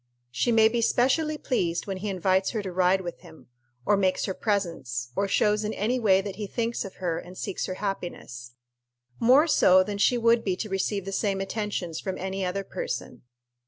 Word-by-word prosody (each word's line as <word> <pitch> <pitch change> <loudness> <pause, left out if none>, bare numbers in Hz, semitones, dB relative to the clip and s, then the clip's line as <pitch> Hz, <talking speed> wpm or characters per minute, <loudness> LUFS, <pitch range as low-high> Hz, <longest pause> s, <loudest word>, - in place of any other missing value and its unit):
She 125 - 0
may 220 -1 +6
be 235 +1 0
specially 300 +7 +2
pleased 175 - -1
when 195 -2 -4
he 205 +3 -4
invites 190 0 +1
her 215 -3 -2
to 190 - -5
ride 185 +1 +2
with 175 -2 -7
him, 160 -6 -16 0.4
or 205 - +4
makes 190 -2 +1
her 190 - -2
presents, 165 - -2
or 200 - +1
shows 210 +1 +2
in 215 +1 -2
any 240 +5 0
way 195 -4 +4
that 195 -1 -7
he 210 -2 -4
thinks 230 +2 -2
of 195 - -9
her 170 -3 -2
and 180 +1 -11
seeks 195 - -3
her 185 - -4
happiness 150 -12 -6 0.6
more 260 +6 +6
so 185 - +5
than 200 +1 -5
she 245 +4 +3
would 230 0 +3
be 190 -2 0
to 215 +3 -5
receive 195 0 -1
the 195 - -4
same 195 -1 0
attentions 195 -4 -3
from 190 -1 -4
any 190 +1 -3
other 185 +2 -2
person. - - -5
195 Hz, 200 wpm, -26 LUFS, 185-215 Hz, 0.6 s, may